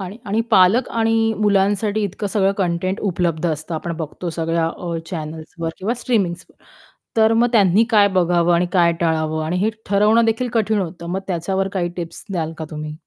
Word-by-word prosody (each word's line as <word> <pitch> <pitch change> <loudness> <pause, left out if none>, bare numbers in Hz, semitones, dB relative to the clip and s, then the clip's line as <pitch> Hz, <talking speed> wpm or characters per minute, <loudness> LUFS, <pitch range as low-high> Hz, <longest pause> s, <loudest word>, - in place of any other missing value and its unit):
आणि 190 +2 -6
आणि 210 +3 0
पालक 210 +5 +5
आणि 225 -1 +1
मुलांसाठी 205 +1 +1
इतकं 200 +2 -4
सगळं 195 -1 +1
कंटेंट 185 +1 -1
उपलब्ध 175 -4 -1
असतं 155 +2 -5
आपण 170 +2 -4
बघतो, 170 +2 -5
सगळ्या 165 0 -1
अ, 170 0 -4
चॅनल्सवर 160 0 -5
किंवा 215 +6 -1
स्ट्रीमिंग्सवर. 185 -8 -1 0.6
तर 220 0 +4
मग 235 +2 +3
त्यांनी 205 -1 +4
काय 205 -2 +5
बघावं 175 0 +3
आणि 175 +1 +2
काय 170 -2 +4
टाळावं, 155 -1 0
आणि 170 +3 -2
हे 210 +4 +1 0.2
ठरवणं 210 +3 +4
देखील 225 +3 0
कठीण 220 -1 +1
होतं. 170 -1 -6
मग 185 +3 -2
त्याच्यावर 190 +2 -1
काही 175 -2 0
टिप्स 170 -1 -6
द्याल 165 -4 -2
का 160 - -4
तुम्ही? 150 -1 -6
185 Hz, 175 wpm, -20 LUFS, 170-210 Hz, 0.6 s, पालक